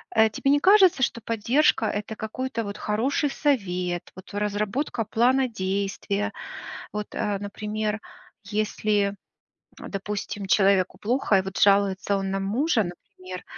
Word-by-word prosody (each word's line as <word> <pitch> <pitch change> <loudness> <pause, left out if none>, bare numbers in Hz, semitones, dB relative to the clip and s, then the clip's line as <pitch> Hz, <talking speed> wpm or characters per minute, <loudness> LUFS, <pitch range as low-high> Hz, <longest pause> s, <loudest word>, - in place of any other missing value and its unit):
Э, 220 0 +6
тебе 275 +5 0
не 290 - +4
кажется, 375 -5 +6
что 235 - 0
поддержка- 230 +3 +2
это 210 +1 -3
какой-то 230 +2 -3
вот 200 -1 -6
хороший 255 +8 0
совет, 180 - -1
вот 185 +2 -12
разработка 210 +5 -1
плана 255 +5 +3
действия? 200 0 -2 0.6
Вот, 210 0 -3
а, 205 -1 -1
например, 210 +1 -3 0.4
если, 210 -1 0 0.6
допустим, 200 0 -5
человеку 195 -1 +3
плохо 235 -2 +1
и - - +1
вот 190 0 -7
жалуется 200 0 +3
он 195 0 -2
на 195 - -1
мужа, 225 +4 +1
например. 185 +1 -9
210 Hz, 130 wpm, -25 LUFS, 195-230 Hz, 0.6 s, Э